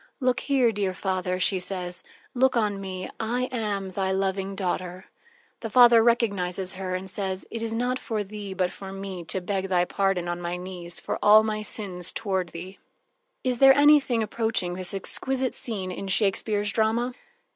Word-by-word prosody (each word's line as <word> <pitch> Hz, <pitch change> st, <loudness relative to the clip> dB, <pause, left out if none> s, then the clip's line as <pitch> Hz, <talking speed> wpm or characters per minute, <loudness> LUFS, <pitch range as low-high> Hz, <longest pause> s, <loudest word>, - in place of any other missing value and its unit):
"Look 255 Hz, -2 st, +1 dB
here, 260 Hz, -5 st, +2 dB
dear 195 Hz, -3 st, -2 dB
father," 185 Hz, -1 st, -2 dB
she 185 Hz, +1 st, +3 dB
says, 180 Hz, -1 st, -3 dB, 0.3 s
"look 260 Hz, -1 st, +3 dB
on 205 Hz, -3 st, 0 dB
me: 185 Hz, -1 st, -5 dB
I 235 Hz, +3 st, -1 dB
am 205 Hz, -5 st, -2 dB
thy 190 Hz, 0 st, -1 dB
loving 195 Hz, 0 st, -1 dB
daughter." 185 Hz, -1 st, -3 dB, 0.5 s
The 225 Hz, -, -5 dB
father 240 Hz, -1 st, +7 dB
recognizes 200 Hz, -6 st, +1 dB
her 185 Hz, -1 st, -3 dB
and 185 Hz, +1 st, -5 dB
says: 190 Hz, 0 st, -4 dB
"It 230 Hz, -, -4 dB
is 230 Hz, -1 st, -3 dB
not 245 Hz, +3 st, -1 dB
for 220 Hz, -4 st, -2 dB
thee, 200 Hz, -1 st, -7 dB
but 185 Hz, -1 st, 0 dB
for 195 Hz, -1 st, -9 dB
me, 195 Hz, -2 st, -6 dB
to 160 Hz, +4 st, -1 dB
beg 190 Hz, +1 st, -2 dB
thy 180 Hz, -1 st, +3 dB
pardon 195 Hz, -2 st, 0 dB
on 175 Hz, 0 st, -3 dB
my 175 Hz, +1 st, -3 dB
knees 180 Hz, -1 st, -7 dB
for -, -, -4 dB
all 215 Hz, +1 st, +7 dB
my 215 Hz, -1 st, -2 dB
sins 185 Hz, -5 st, -3 dB
toward 190 Hz, -5 st, -2 dB
thee." 180 Hz, +4 st, -9 dB, 0.6 s
Is 250 Hz, -2 st, 0 dB
there 270 Hz, 0 st, +8 dB
anything 285 Hz, -5 st, +5 dB
approaching 220 Hz, -4 st, -1 dB
this 185 Hz, +1 st, -3 dB
exquisite 260 Hz, +6 st, -1 dB
scene 195 Hz, -6 st, -4 dB
in 195 Hz, +2 st, -5 dB
Shakespeare's 205 Hz, +1 st, +1 dB
drama? 230 Hz, +3 st, +1 dB
195 Hz, 175 wpm, -26 LUFS, 185-225 Hz, 0.6 s, there